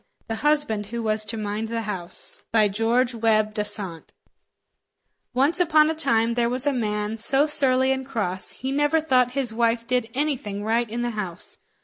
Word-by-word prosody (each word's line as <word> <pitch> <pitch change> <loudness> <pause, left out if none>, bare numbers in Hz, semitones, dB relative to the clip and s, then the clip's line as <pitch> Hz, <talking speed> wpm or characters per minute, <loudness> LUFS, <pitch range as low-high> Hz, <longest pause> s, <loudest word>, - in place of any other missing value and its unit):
THE 225 - -4
HUSBAND 290 -7 0
WHO 235 +2 -5
WAS 215 0 0
TO 225 +2 -4
MIND 215 +1 -4
THE 230 0 -3
HOUSE 190 -5 -5
By 220 -2 +4
Sir 200 - -2
George 240 +4 +1
Webbe 215 -2 +1
Dasent 205 -6 -2 1.2
Once 280 +7 +2
upon 315 -3 +4
a - - -2
time 235 -7 +1
there 235 0 0
was 255 +2 +1
a 290 - +1
man, 210 -2 -3
so 270 +5 +3
surly 265 -3 +6
and 265 0 -2
cross, 205 -8 -2
he 260 +1 -5
never 295 +3 +1
thought 255 -5 +1
his 260 -4 -1
wife 230 0 0
did 250 -2 -1
anything 260 -9 -3
right 230 +1 0
in 235 +2 -4
the 240 - -2
house. 190 -6 -6
230 Hz, 185 wpm, -23 LUFS, 215-265 Hz, 1.2 s, surly